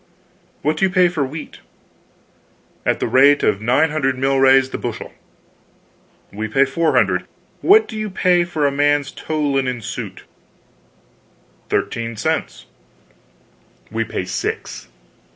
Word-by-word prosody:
What 155 +1 0
do 190 - +3
you - - +1
pay 180 -1 +3
for 160 -4 -1
wheat?" 150 +4 -7 1.3
"At - - +1
the - - -1
rate 140 +2 +5
of 100 - +1
nine 130 +8 +2
hundred 135 -4 0
milrays 135 0 +3
the - - -4
bushel." - - -6 1.2
"We 110 +2 -4
pay 135 +5 +3
four 160 +5 0
hundred. - - +1 0.3
What 435 +3 +5
do 220 - -8
you 215 -1 -3
pay 180 -2 +2
for 160 -4 -2
a 140 - +2
man's 145 0 +1
tow 155 -1 -4
linen 135 -3 0
suit?" 110 0 -7 1.5
"Thirteen 115 -1 -2
cents." 110 - -2 1.3
"We 115 +1 -1
pay 100 -4 -4
six. - - -4
140 Hz, 135 wpm, -19 LUFS, 130-160 Hz, 1.5 s, rate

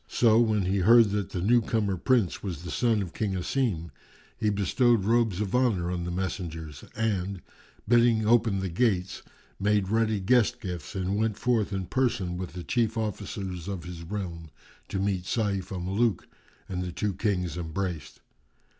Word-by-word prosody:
So, 115 -2 +4
when 110 -4 +2
he 95 +2 0
heard 115 +2 +6
that 105 -1 -1
the 90 - -4
new 120 +4 +4
comer 105 -3 0
Prince 110 0 +1
was 90 -5 -5
the 90 - -6
son 115 -4 +2
of 90 - -8
King 100 -3 -1
Asim, 90 - -1 0.4
he 110 -3 0
bestowed 105 +2 +2
robes 110 -3 +2
of 100 -3 -3
honour 110 -9 +2
on 90 -1 -3
the - - -3
messengers 85 -5 -4
and, 100 -4 -1 0.5
bidding 115 -1 +4
open 110 -4 +3
the 95 - -2
gates, 95 -1 0 0.4
made 100 -1 +1
ready 110 -1 +1
guest 120 +4 +3
gifts 90 -3 -6
and 95 +1 -1
went 110 -1 0
forth 115 -4 +1
in 95 -1 -2
person 95 -5 0
with 90 -1 -5
the 90 -1 -6
chief 115 +1 0
officers 100 -4 -4
of 95 -4 -4
his 90 -2 -8
realm, 85 -3 -5 0.4
to - - -4
meet 95 -2 -1
Sayf 100 -2 -1
al 95 -2 -4
Muluk, 100 +2 0 0.4
and 90 -1 -3
the 90 -1 -3
two 100 +4 -2
Kings 90 -4 -1
embraced. 85 0 -4
100 Hz, 170 wpm, -27 LUFS, 90-110 Hz, 0.5 s, heard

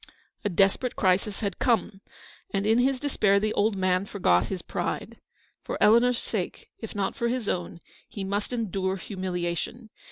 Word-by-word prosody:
A 205 - +1
desperate 195 +7 +2
crisis 195 +2 +1
had 200 -4 -2
come, 215 -5 +1 0.5
and 200 0 0
in 225 +2 +4
his 260 +1 +2
despair 210 -8 +2
the 215 +1 0
old 210 +1 +2
man 185 0 +1
forgot 90 - +2
his 185 -2 -4
pride. - - -4 0.4
For - - -4
Eleanor's 235 +3 +5
sake, 195 -6 -4
if 225 - -7
not 195 -1 -1
for 235 - 0
his 240 -2 -2
own, 175 -1 -2 0.3
he 200 - -5
must 200 +3 -2
endure 195 -5 -1
humiliation. 185 +4 -4
200 Hz, 160 wpm, -27 LUFS, 190-225 Hz, 0.5 s, Eleanor's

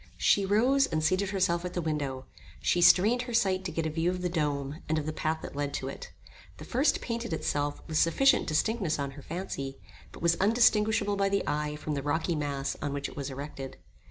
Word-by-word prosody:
She 200 -1 +3
rose, 255 +7 +3
and 155 -1 -1
seated 185 +4 +1
herself 180 -3 +1
at 180 0 -5
the - - 0
window. 140 -4 -3 0.3
She 175 - +1
strained 215 +8 +6
her 235 - -2
sight 190 -4 +2
to 180 - -2
get 165 0 -2
a - - 0
view 165 +2 0
of 180 0 -3
the 180 - 0
dome, 150 -2 -2
and 160 - +1
of 155 - -2
the 155 - -3
path 160 +1 -2
that - - -7
led 145 0 -2
to 135 - -3
it. - - -9 0.5
The - - -9
first 265 +5 +1
painted 235 -5 -3
itself 145 -2 -2
with 155 -2 0
sufficient 270 - +4
distinctness 185 +2 0
on 140 -1 -3
her 145 +1 -11
fancy, 140 -5 -5 0.3
but - - -11
was 170 0 +3
undistinguishable 215 -1 +3
by 195 0 +2
the 200 0 +1
eye 150 +1 -1
from 150 0 -4
the 140 - -2
rocky 160 +4 0
mass 140 -2 -2
on 145 -1 -2
which 140 0 -3
it - - -13
was 140 -1 -4
erected. 135 0 -7
160 Hz, 220 wpm, -29 LUFS, 145-195 Hz, 0.5 s, strained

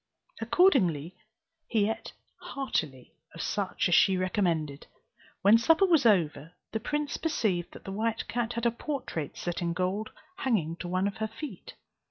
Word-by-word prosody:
Accordingly 185 - +3 0.5
he 210 -3 +2
ate 225 - -4 0.3
heartily 155 - -3 0.2
of 165 - -5
such 200 -2 -1
as 175 - +1
she 190 +2 +5
recommended. 170 -6 -1 0.6
When 210 +4 +7
supper 325 +10 +5
was 325 -9 +4
over, 165 -5 +2 0.2
the 220 - -1
prince 295 +5 -2
perceived 210 - -1
that - - -12
the 195 - -6
white 220 +3 -1
cat 240 0 -2
had 235 0 -3
a 235 - +4
portrait 235 - -4
set 175 +1 -3
in 170 -1 0
gold 185 +4 -1 0.3
hanging 210 - 0
to 175 - -6
one 185 +2 0
of 200 - -2
her 220 0 -1
feet. 225 - -9
200 Hz, 160 wpm, -29 LUFS, 175-235 Hz, 0.6 s, When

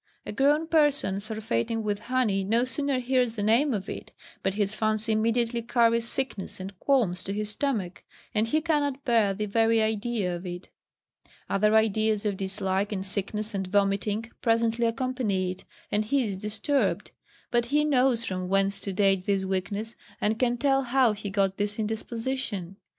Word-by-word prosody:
A - - -4
grown 290 +4 +3
person 295 - +2
surfeiting 215 - -2
with 205 -1 -1
honey 230 -5 0
no 230 +5 +2
sooner 280 +1 -1
hears 250 -2 +1
the 205 - -2
name 235 +7 +3
of 200 -5 -2
it, - - -7 0.3
but 195 0 -1
his 205 -1 0
fancy 215 +1 0
immediately 230 +2 +1
carries 230 0 +2
sickness 255 -10 -3
and 190 +1 -7
qualms 230 -11 +2
to 195 - -4
his 210 +1 -2
stomach, 210 -8 -2 0.3
and 215 +1 +1
he 310 +6 +1
cannot 290 -4 0
bear 225 -5 +3
the 210 +2 -2
very 225 +2 +3
idea 220 -3 0
of 175 - -7
it; 175 +1 -7 0.8
other 210 +2 +2
ideas 220 0 +2
of 205 -2 0
dislike, 195 +1 -2
and 195 -2 -3
sickness, 210 +3 -2
and 190 -1 -2
vomiting, 205 +3 0
presently 230 0 +2
accompany 230 -6 -1
it, 185 - -10 0.3
and 210 +1 +1
he 270 +4 +2
is 205 -4 -3
disturbed; 215 +8 -1 0.4
but 240 -1 +2
he 295 +3 +2
knows 255 -5 +2
from 185 -1 -3
whence 195 0 +1
to 200 - -4
date 195 -1 +2
this 195 -1 +1
weakness, 200 +4 -3 0.2
and 220 +2 0
can 245 -1 +2
tell 270 +1 +2
how 255 -2 +3
he 205 -1 -6
got 195 -1 +1
this 205 0 -1
indisposition. 220 -3 -3
220 Hz, 170 wpm, -27 LUFS, 195-240 Hz, 0.8 s, grown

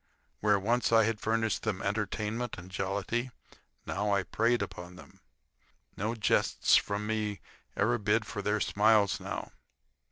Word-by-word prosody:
Where 105 -1 +3
once 120 +5 +1
I 115 -1 +6
had 110 -1 0
furnished 110 -1 0
them 105 -4 -2
entertainment 105 +3 -2
and 90 +1 -11
jollity, 100 +6 -2 0.2
I - - -23 0.3
now 100 0 0
preyed 120 +1 +2
upon 90 +1 -8
them. - - -15 0.8
No 110 +4 -2
jests 105 -4 +3
from 100 +1 +1
me 105 -2 -2 0.4
ever 120 +4 +2
bid 105 +2 +1
for 105 -1 -5
their 105 +1 0
smiles 105 -1 +3
now. - - -5
105 Hz, 140 wpm, -30 LUFS, 100-115 Hz, 0.8 s, I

